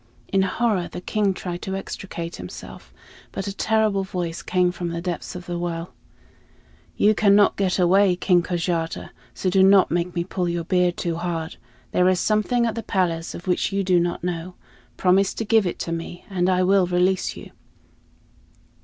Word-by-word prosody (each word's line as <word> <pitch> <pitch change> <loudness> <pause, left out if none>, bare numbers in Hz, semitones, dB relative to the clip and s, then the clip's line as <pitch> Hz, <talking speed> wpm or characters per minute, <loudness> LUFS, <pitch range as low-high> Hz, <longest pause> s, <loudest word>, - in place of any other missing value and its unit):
In 195 - +2
horror, 195 -2 0
the - - -6
king 205 +2 0
tried 180 -2 -5
to 190 - -4
extricate 175 -3 -6
himself, 90 0 -10 0.4
but 195 - -4
a 200 - -4
terrible 215 -3 +1
voice 175 -3 -4
came 180 -1 +1
from 175 -1 -4
the 170 0 -3
depths 175 +1 -4
of 180 0 -7
the 175 -1 -4
well: 170 0 -4 1.0
"You 215 - +4
cannot 205 -1 +4
get 190 -2 0
away, 185 +1 +4
King 180 -1 +3
Kojata, 170 -1 -2 0.2
so 185 - -1
do 190 0 +4
not 195 0 +6
make 175 +1 -1
me 170 - 0
pull 180 0 -2
your 170 0 -2
beard 180 +1 +1
too 170 -2 -2
hard. 165 -2 -4 0.3
There 180 +1 +3
is 185 -1 +2
something 220 +3 +1
at 230 - 0
the 230 - -4
palace 170 -6 -1
of 175 - -9
which 180 +1 0
you 195 0 0
do 180 -2 +3
not 175 0 -2
know; 180 0 -4 0.4
promise 190 +1 +3
to 225 - -3
give 220 -3 +3
it 175 - -3
to 170 - -4
me, 165 +1 -6
and 180 -1 +1
I 185 0 +3
will 190 0 +3
release 180 +1 +1
you." - - -11
180 Hz, 185 wpm, -23 LUFS, 175-195 Hz, 1.0 s, not